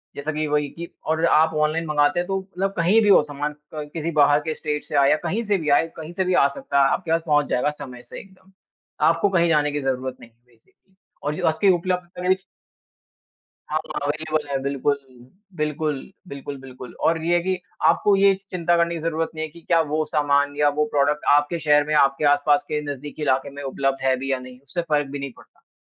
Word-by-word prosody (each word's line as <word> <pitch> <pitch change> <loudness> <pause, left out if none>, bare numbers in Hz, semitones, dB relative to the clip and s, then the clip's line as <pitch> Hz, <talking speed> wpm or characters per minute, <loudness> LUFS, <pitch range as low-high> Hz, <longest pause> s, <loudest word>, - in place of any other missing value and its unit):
जैसा 145 +2 -3
कि 155 +1 -1
वही 150 -1 0
कि 170 +3 -8 0.2
और 160 +1 +1
आप 160 -1 +4
ऑनलाइन 155 +2 0
मँगाते 145 +1 +2
हैं 175 - -2
तो 195 0 -1
मतलब 190 +1 -3
कहीं 185 +7 +4
भी 210 - +3
हो 195 - +7
सामान 145 0 -4 0.2
क 150 -1 -6
किसी 165 0 -3
बाहर 145 -1 +4
के 155 - 0
स्टेट 150 -1 -3
से 150 - -6
आया, 140 +1 +5
कहीं 205 +8 -1
से 205 -2 +1
भी 155 -3 -3
आए, 145 +3 +4
कहीं 160 +1 -8
से 190 +2 0
भी 185 - +1
आ 140 - +5
सकता 140 0 0
है, 135 - +4
आपके 175 -3 -2
पास 165 0 +2
पहुँच 150 -1 +3
जाएगा 125 - +1
समय 135 -5 -9
से - - -10
एकदम। 190 0 -18 0.6
आपको 165 +5 +3
कहीं 170 -3 +2
जाने 150 -2 +2
की 145 0 -2
ज़रूरत 130 -1 -2
नहीं 115 - -14
है 115 - -37
बेसिकली 120 +10 -32 0.3
और 150 - -1
जो - - -2
आपके 160 +5 +3
उपलब्ध 180 0 -2
करें 180 +1 +2 1.3
हाँ, 155 +1 0 0.2
अवेलेबल 155 +1 -2
है, 140 - 0
बिल्कुल। 140 +1 0 0.6
बिल्कुल, 150 -1 -1 0.3
बिल्कुल, 140 -2 -7
बिल्कुल, 130 -2 -11
और 165 0 +1
ये 170 - +1
है 175 - +2
कि 185 0 0 0.3
आपको 200 +4 +4
ये 195 0 +5 0.2
चिंता 175 -1 +1
करने 170 0 +1
की 160 - -5
ज़रूरत 165 0 -1
नहीं 155 0 -3
है - - -9
कि 170 - -15
क्या 165 0 +2
वो 155 +1 +1
सामान 145 -1 +1
या 150 0 +4
वो 150 - +3
प्रोडक्ट 145 +1 +1
आपके 145 +3 +1
शहर 150 -1 +4
में, 155 - -1
आपके 140 +1 +3
आस-पास 145 0 +3
के 150 0 -1
नजदीकी 145 +2 -8
इलाके 135 -1 +1
में 145 - -7
उपलब्ध 135 0 -1
है 130 -1 +3
भी 135 +1 -3
या 135 - 0
नहीं, 125 0 -12
उससे 140 +6 -4
फ़र्क 150 -4 0
भी 140 - -5
नहीं 140 -1 -5
पड़ता। - - -22
150 Hz, 225 wpm, -23 LUFS, 145-170 Hz, 1.3 s, हो